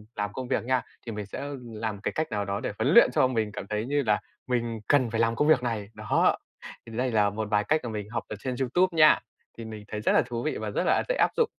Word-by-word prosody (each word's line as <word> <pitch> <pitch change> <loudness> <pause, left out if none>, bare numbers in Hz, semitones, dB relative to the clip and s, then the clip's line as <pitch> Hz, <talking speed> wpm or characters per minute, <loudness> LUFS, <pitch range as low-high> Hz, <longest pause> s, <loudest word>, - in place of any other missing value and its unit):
làm 105 -1 -3
công 130 +2 -5
việc 130 - 0
nha 130 +1 +1 0.2
thì 115 - -4
mình 105 -1 -5
sẽ 100 - -6 0.2
làm 110 -3 -5
cái - - -1
cách 155 -6 -1
nào 105 -1 -1
đó 100 +1 -2
để - - -3
huấn - - +2
luyện - - +8
cho 130 - +4
mình 110 -4 -1
cảm 100 - -7
thấy 105 +1 -2
như 145 +2 +1
là 105 -2 +2 0.3
mình 120 -3 -1
cần 130 -5 +3
phải 115 - -2
làm 115 0 +2
công 150 - +1
việc 145 -6 +5
này, 110 -4 -2
đó, - - +2 0.5
thì 115 -1 -8
đây 125 0 0
là 105 -2 +3
một 110 +1 -4
vài 105 0 +3
cách 155 +7 +1
mà 120 - -4
mình 105 -1 -5
học 115 +1 -3
ở - - -5
trên 130 +2 -3
YouTube 170 +7 +1
nha, 155 -1 +7 0.4
thì 115 - -7
mình 110 -1 -8
thấy 105 0 -5
rất - - +2
là - - +5
thú 120 0 -4
vị 155 - -1
và - - -4
rất - - -1
là, - - +5
ờ, - - +2
dễ - - +2
áp - - +4
dụng. 465 -2 +3
115 Hz, 290 wpm, -27 LUFS, 105-130 Hz, 0.5 s, luyện